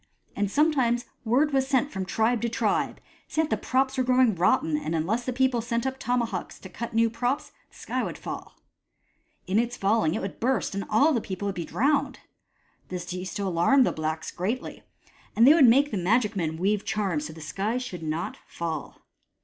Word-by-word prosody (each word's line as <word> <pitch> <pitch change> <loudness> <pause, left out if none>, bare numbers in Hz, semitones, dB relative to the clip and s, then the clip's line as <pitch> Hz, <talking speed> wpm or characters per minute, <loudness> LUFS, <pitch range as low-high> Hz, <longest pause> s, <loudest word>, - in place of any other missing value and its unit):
And 205 -1 0
sometimes 260 -3 +2 0.2
word 270 +6 +2
was 265 -1 +2
sent 275 +1 +1
from 190 -1 -3
tribe 225 +3 +1
to 235 - 0
tribe, - - 0 0.3
saying 315 0 0
that - - +2
the - - -11
props 265 +1 +1
were - - +3
growing 255 -2 +4
rotten, 170 -3 +2
and 155 +2 -2
unless 210 +10 -1
the 255 - -1
people 255 -1 +1
sent 235 +1 -2
up 265 0 -3
tomahawks 235 -5 -2
to 190 - -11
cut 230 +5 -6
new 230 0 +4
props, 245 +4 -2 0.2
the - - -23
sky - - -3
would - - -4
fall. - - -7 0.9
In 195 +4 +2
its 240 +1 -1
falling 200 -4 +2
it - - -2
would 195 - -6
burst, 255 -1 0
and 195 0 -3
all 285 +9 +4
the 235 - +1
people 190 0 -5
would 200 - -1
be 170 -3 -4
drowned. 280 - +1 0.7
This 180 -1 -5
used 185 +2 -5
to 200 - -2
alarm 190 +9 +4
the - - +1
blacks 155 0 -3
greatly, 215 +9 -4 0.5
and 230 - +6
they 285 - +9
would 305 -6 +6
make 280 +5 +4
the 210 - -1
magic 210 +4 +1
men 160 -4 -2
weave 200 +4 +1
charms 195 -7 -1
so 160 - -7
that - - -15
the 160 - -10
sky 200 +9 -2
should 215 -9 -5
not 155 +1 -3
fall. 165 -3 -5
225 Hz, 205 wpm, -26 LUFS, 185-255 Hz, 0.9 s, they